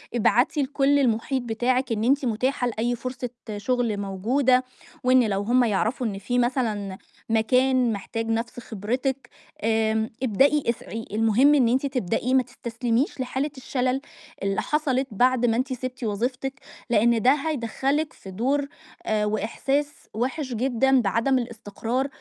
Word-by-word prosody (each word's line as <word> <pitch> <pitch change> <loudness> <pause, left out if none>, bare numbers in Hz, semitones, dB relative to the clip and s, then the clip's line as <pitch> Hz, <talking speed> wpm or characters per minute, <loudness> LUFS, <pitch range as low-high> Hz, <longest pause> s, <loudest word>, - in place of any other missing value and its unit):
ابعتي 245 +5 +3
لكُل 280 +1 +2
المحيط 255 +1 +1
بتاعِك 245 +2 0
إن 220 -1 0
أنتِ 275 +3 +2
متاحة 250 +2 0
لأي 240 +1 -1
فرصة 250 +1 -5 0.3
شغل 235 0 0
موجودة، 245 +7 +2 0.4
وإن 255 0 +5
لو 195 0 0
هُم 245 +4 +3
يعرفوا 230 +3 0
إن 200 -3 -4
في 245 +5 -1
مثلًا 220 -6 -1 0.3
مكان 250 +2 +3
محتاج 225 +3 -4
نفس 230 +2 -2
خبرتِك، 250 +5 -3 0.3
آآ 220 0 +1
ابدئي 275 +6 +3
اسعي. 225 -1 -4
المهم 225 +7 +4
إن 255 -5 +4
أنتِ 260 +3 +1
تبدئي، 250 -1 -1
ما 260 -1 +5
تستسلميش 245 +1 -2
لحالة 265 +3 -2
الشلل 255 0 -1 0.4
اللي 195 0 0
حصلت 275 -3 +1
بعد 245 +3 +3
ما 225 - +2
أنتِ 260 +1 -1
سِبتِ 255 0 -6
وظيفتِك، 245 +5 -2 0.4
لأن 235 0 +3
ده 255 - +6
هيدخلِك 290 +1 -1
في 190 - -11
دور 270 +8 0 0.4
آآ 215 -1 +1
وإحساس 270 +7 -1 0.2
وِحِش 255 +4 -2
جدًا 260 +2 +2
بعدم 230 +6 +1
الاستقرار، 235 +2 -3
245 Hz, 140 wpm, -25 LUFS, 225-265 Hz, 0.4 s, ده